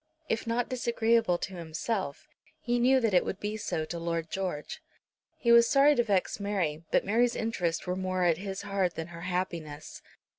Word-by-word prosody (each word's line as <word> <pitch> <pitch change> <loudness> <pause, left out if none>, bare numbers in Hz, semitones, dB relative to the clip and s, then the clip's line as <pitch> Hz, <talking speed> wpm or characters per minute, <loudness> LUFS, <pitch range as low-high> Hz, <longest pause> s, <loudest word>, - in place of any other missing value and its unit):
If 225 +1 -1
not 235 +1 0
disagreeable 230 -5 +1
to 190 - -5
himself, 170 0 -4 0.3
he 240 0 0
knew 260 +2 +5
that 225 -5 +1
it 180 - +5
would 190 - -4
be 210 +1 -3
so 160 -7 -2
to 170 +2 -5
Lord 165 -1 -3
George. 185 -6 -4 0.6
He 235 - +2
was 235 0 +7
sorry 285 +1 +6
to 240 - +2
vex 200 -4 0
Mary, 180 -7 -1
but - - +2
Mary's 235 +4 +2
interests 180 -7 -1
were 180 - -1
more 185 -1 -1
at 170 -2 +3
his 195 0 -5
heart 195 -3 0
than 165 +1 -5
her 170 -1 -9
happiness. 175 -4 -4
190 Hz, 185 wpm, -29 LUFS, 170-230 Hz, 0.6 s, was